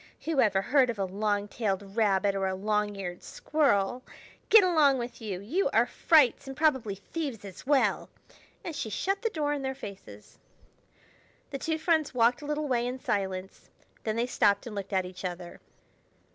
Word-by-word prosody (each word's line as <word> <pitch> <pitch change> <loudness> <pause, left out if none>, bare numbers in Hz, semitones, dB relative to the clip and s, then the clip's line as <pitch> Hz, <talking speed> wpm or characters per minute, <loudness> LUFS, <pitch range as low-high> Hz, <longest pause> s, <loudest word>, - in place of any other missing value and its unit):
Who 320 -4 0
ever 195 -3 +2
heard 260 0 +3
of 230 - -3
a 195 - 0
long 205 +2 -1
tailed 200 -2 -3
rabbit 200 -3 +2
or 195 -1 -1
a 190 - -2
long 210 +1 -1
eared 180 -3 -6
squirrel? 250 -6 0 0.5
Get 440 -2 +8
along 310 -7 +4
with 240 0 -6
you! 200 -5 -4
You 280 - 0
are 230 +2 +5
frights, 280 0 +3
and 270 0 -7
probably 265 -10 +1
thieves 235 - -5
as 195 +5 -11
well." 280 -2 +2 0.5
And 330 - -5
she 220 - -3
shut 390 - -1
the 455 - 0
door 295 -6 -1
in 285 - -3
their 265 0 -3
faces. 190 - -11 1.1
The 275 - -4
two 320 +3 -1
friends 320 -4 +1
walked 240 +3 +3
a 290 - -7
little 300 0 -2
way 245 -2 0
in 255 +1 -4
silence; 190 -4 -3 0.3
then 215 -1 -1
they 235 +1 +1
stopped 205 -5 +2
and 235 - -7
looked 200 0 -5
at 190 -2 +1
each 185 +1 -9
other. 175 -1 -6
230 Hz, 185 wpm, -28 LUFS, 195-285 Hz, 1.1 s, Get